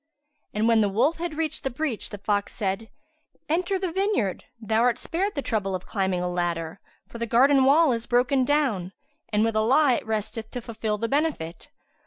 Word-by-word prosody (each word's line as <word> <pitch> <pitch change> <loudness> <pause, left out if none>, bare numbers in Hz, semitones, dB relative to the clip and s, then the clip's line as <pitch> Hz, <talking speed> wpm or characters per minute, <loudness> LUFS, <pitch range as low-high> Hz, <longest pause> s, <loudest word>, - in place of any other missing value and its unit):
And 215 +2 +2
when 230 -1 +5
the 205 - +2
wolf 260 +12 +1
had 335 -3 -4
reached 310 -1 -1
the 270 - 0
breach 260 -2 -3
the 205 - -7
fox 205 0 -1
said, 210 +1 -2 0.6
"Enter 360 +5 0
the 370 -2 -2
vineyard: 380 - 0
thou 220 0 0
art 245 -1 +3
spared 370 +8 -2
the 280 - -2
trouble 195 -4 -1
of 185 - -6
climbing 190 -3 -1
a 180 - -1
ladder, 175 -1 -2 0.3
for 235 - -10
the 235 - -2
garden 265 +4 +5
wall 300 +2 +5
is 230 -1 -2
broken 255 +2 +2
down, 250 -10 0 0.4
and 210 -1 +2
with 225 -1 0
Allah 250 +5 +4
it - - -8
resteth 220 +1 -3
to 245 - -5
fulfil 220 -2 -3
the 230 - -2
benefit." 275 - -2
230 Hz, 195 wpm, -25 LUFS, 205-290 Hz, 0.6 s, when